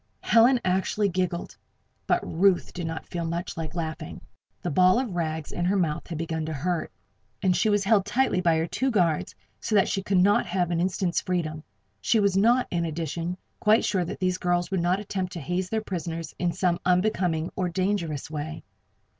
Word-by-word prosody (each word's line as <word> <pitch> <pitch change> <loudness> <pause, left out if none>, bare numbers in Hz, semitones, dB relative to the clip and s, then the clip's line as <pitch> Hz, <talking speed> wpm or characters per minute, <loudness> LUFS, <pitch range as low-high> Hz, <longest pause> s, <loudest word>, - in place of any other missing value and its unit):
Helen 240 +3 +5
actually 190 +2 +1
giggled. 180 -1 -2 0.5
But - - +2
Ruth 185 +2 +2
did 175 -2 -4
not 160 -1 -5
feel 170 -1 -4
much 170 +2 -3
like 160 -1 -5
laughing. 160 -2 -4 0.4
The - - -1
ball 185 +6 +5
of 245 -8 -2
rags 160 -3 -2
in 175 - -3
her 190 +3 +2
mouth 165 -6 -1
had 165 - -5
begun 160 0 -3
to 160 - -3
hurt 170 +4 -2
her, - - -43 0.5
and 185 -2 +3
she 220 - +2
was 205 -1 +2
held 205 -1 +4
tightly 205 -2 +1
by 165 -3 +3
her 160 - +1
two 260 +10 -1
guards 175 -9 +1 0.2
so 220 - -1
that 195 - +5
she 195 - -1
could 190 0 0
not 200 +3 +4
have 175 -1 0
an 170 0 +1
instant's 185 -1 0
freedom. 160 -5 -2 0.4
She 220 - +3
was 200 -2 +2
not, 235 +6 +4
in 170 -1 0
addition, 165 +2 -3 0.2
quite 215 +2 +4
sure 190 -3 +1
that 170 - -6
these 185 0 0
girls 175 +1 0
would 190 -3 +1
not 180 +3 +1
attempt 190 -3 -4
to 170 - -5
haze 180 +4 -2
their 220 +1 -1
prisoners 165 -4 -4
in 175 -1 +1
some 175 0 0
unbecoming, 180 -3 +1
or 185 -2 -1
dangerous, 175 -5 -1
way. 155 +1 -5
180 Hz, 200 wpm, -26 LUFS, 165-195 Hz, 0.5 s, Helen